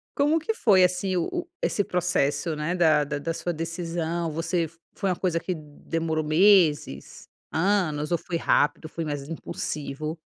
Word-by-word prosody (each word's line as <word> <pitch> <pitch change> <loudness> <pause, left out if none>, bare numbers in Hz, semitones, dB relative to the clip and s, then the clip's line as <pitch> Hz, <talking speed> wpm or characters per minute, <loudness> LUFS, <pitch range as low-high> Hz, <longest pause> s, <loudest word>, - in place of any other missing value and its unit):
Como 300 +3 +3
que 445 +8 -2
foi, 195 - +4
assim, 180 +1 +1
o 175 - 0
o 350 -1 -3
esse 205 - +1
processo, 165 -4 0
né, 150 +4 -2
da 155 -4 +4
da 145 0 -3
da 165 +3 -2
sua 175 +1 -3
decisão? 165 0 -3
Você 165 +2 -1
f 165 +1 -8 0.2
foi 195 - -1
uma 180 - +1
coisa 170 -2 0
que 185 - -3
demorou 155 +1 -3
meses, 155 - +3 0.2
anos 165 -4 +1
ou 170 - +3
foi 170 - -6
rápido, 155 0 +1
foi 165 0 -4
mais 145 -2 -4
impulsivo? 155 -1 -4
165 Hz, 170 wpm, -26 LUFS, 155-180 Hz, 0.2 s, foi